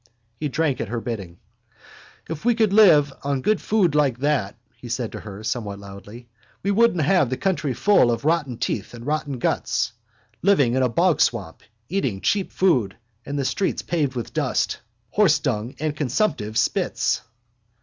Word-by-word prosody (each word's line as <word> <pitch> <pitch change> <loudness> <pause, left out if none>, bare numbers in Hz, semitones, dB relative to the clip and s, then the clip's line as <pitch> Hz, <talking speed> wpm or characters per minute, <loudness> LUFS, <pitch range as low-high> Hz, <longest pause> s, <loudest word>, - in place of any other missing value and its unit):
He 150 - -2
drank 145 -3 0
at - - -3
her 120 +3 -3
bidding. 100 -8 -6 0.9
—If 160 -2 -6
we 240 0 +3
could 220 -3 +2
live 155 -10 +6
on 140 -2 -2
good 215 -1 +2
food 195 -7 +2
like 145 -5 +2
that, 135 -9 0 0.2
he 120 - -11
said 115 -1 -2
to - - -7
her 105 0 -9
somewhat 110 -3 -3
loudly, 100 +4 -11 0.4
we 200 - +1
wouldn't 200 -6 +3
have 150 -3 +3
the 130 - -2
country 165 -9 -1
full 205 -12 +4
of 115 +3 -1
rotten 150 -7 +1
teeth 110 +1 -3
and 120 0 -10
rotten 145 -2 -2
guts. 115 -1 -1 0.5
Living 145 -11 +3
in 130 - +2
a 130 - +2
bogswamp, 115 - +1 0.3
eating 135 - -1
cheap 195 - 0
food 125 - +1 0.3
and 145 - -3
the 140 - -1
streets 195 - -1
paved 145 -6 -1
with 120 -3 -5
dust, - - 0 0.3
horsedung 135 - +1
and 155 0 -2
consumptives' 125 - 0
spits. - - 0
135 Hz, 165 wpm, -23 LUFS, 115-170 Hz, 0.9 s, live